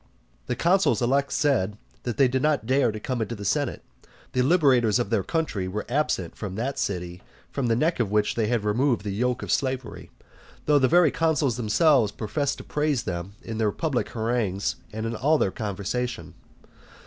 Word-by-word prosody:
The - - -1
consuls 175 - +3
elect 135 +3 +1
said, 120 -9 +1 0.3
that 120 0 -3
they 135 -2 +5
did 130 +1 -1
not 150 -6 +1
dare 130 -1 +2
to 110 - -6
come 125 +2 -3
into 110 +2 -3
the 100 -1 -8
senate. 140 +6 -1 0.5
The 125 - +1
liberators 130 - +4
of 120 - -2
their 110 -4 +2
country 140 - -2
were 105 +3 -4
absent 120 - -1
from 95 -4 -6
that 125 +6 -3
city 90 -2 -3 0.3
from 135 -3 -1
the 115 - +2
neck 155 +6 +1
of 115 -4 +1
which 105 0 +1
they 110 -2 0
had 120 -2 0
removed 115 +2 +1
the 100 -2 -3
yoke 125 +4 -1
of - - -3
slavery; 130 -4 -2 0.6
though 150 -1 +4
the 130 - +4
very 170 0 +5
consuls 160 -6 +1
themselves 120 +1 +3
professed 135 +7 -2
to - - -9
praise 150 -4 0
them 90 +3 -5
in 115 -1 -5
their 110 -2 +2
public 140 +1 -1
harangues 110 -4 -1 0.2
and 110 +1 -4
in 115 +1 -2
all 150 +8 +3
their 95 - +1
conversation. 110 +4 -4
120 Hz, 190 wpm, -25 LUFS, 105-140 Hz, 0.6 s, they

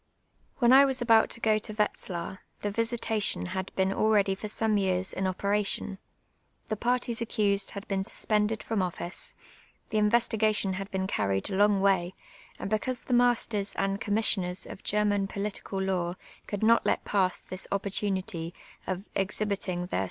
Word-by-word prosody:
\\'li('U 240 0 +5
I 275 +1 +9
was 265 -2 +1
about 230 -2 +5
to 235 - -4
^o 215 -1 +3
to 215 -1 -6
Wetzhir, 190 -4 -2 0.2
the 205 - -1
"visitation" 225 -2 0
had 185 +1 -4
)(en 190 0 +2
already 205 -3 +3
for 195 +3 -6
some 215 0 +1
yeai*s 190 -1 0
in 190 - -1
operation, 200 +1 0 0.7
the 215 - 0
parties 240 +1 -1
accused 205 -3 +1
lad 200 - -7
been 195 -1 0
8us})ended 215 +2 0
from 220 -3 -1
office, 180 0 -4 0.5
the 215 - +1
investi«:^tion 215 -2 +2
had 195 +1 -5
been 190 0 -2
juried 100 - -1
a - - -1
lon^ 205 0 +4
way; 190 -2 +2 0.4
and 195 - -5
becau.se 245 +4 -1
the 250 - -2
masters 235 -4 +2
and 195 +2 -1
commis 220 -1 +3
sioners 180 -2 -3
of - - -10
German 205 -1 +1
j)olitieal 195 -1 -3
law 180 -2 -1 0.3
could 205 0 -3
not 230 +1 +5
let - - 0
pass 190 -3 +1
this 185 +1 -5
o])])or 200 0 -1
unitv 185 -4 -2 0.3
of 185 +1 -3
exhibiting 195 -2 -1
their 135 - -2
200 Hz, 165 wpm, -28 LUFS, 190-215 Hz, 0.7 s, I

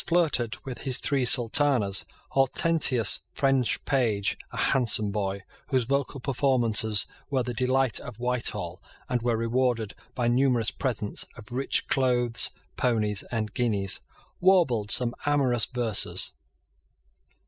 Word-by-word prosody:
flirted 160 -10 +1
with 130 -2 -7
his 130 -2 0
three 140 -3 0
sultanas, 120 -4 +2 0.3
Hortensia's 135 -3 +3
French 135 -4 0
page, 115 -8 0
a - - -10
handsome 110 -5 +3
boy, 100 -1 -3 0.2
whose 130 -3 +1
vocal 140 +2 -2
performances 120 -6 +1 0.2
were 135 -3 0
the 125 0 -4
delight 130 0 +1
of - - -10
Whitehall, 125 0 -1 0.3
and 125 -2 -1
were 120 -1 0
rewarded 115 -2 -1 0.2
by 120 -2 0
numerous 120 -2 +2
presents 115 -6 -2
of 110 -3 -13
rich 130 +3 -1
clothes, 120 -3 +1 0.3
ponies, 105 -5 0
and 110 -3 -3
guineas, 105 -6 0 0.4
warbled 165 - +3
some 120 +1 +2
amorous 130 -5 +1
verses. 120 -5 +1
125 Hz, 120 wpm, -26 LUFS, 110-135 Hz, 0.4 s, Hortensia's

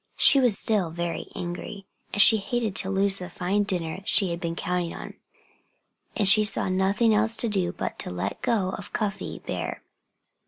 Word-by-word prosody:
She 275 - +6
was 245 -6 +3
still 205 -6 0
very 170 +1 -4
angry. 180 +3 -6 0.3
And 205 - -4
she 220 +2 +8
hated 220 -1 -2
to 190 - +4
lose 195 0 +2
the 180 0 -7
fine 185 +3 -1
dinner 180 -3 -3
she 195 -2 +2
had 170 - -4
been 170 -2 -3
counting 180 -1 -2
on. - - -8 1.0
But 205 - +1
she 215 +2 +6
saw 210 -2 0
nothing 195 +5 +2
else 220 +2 +2
to 235 - +1
do 190 -5 -1
but - - -3
let 90 +3 -4
go 195 -5 0
of - - -8
Cuffy 210 -3 -4
Bear. - - -5
195 Hz, 180 wpm, -25 LUFS, 175-210 Hz, 1.0 s, she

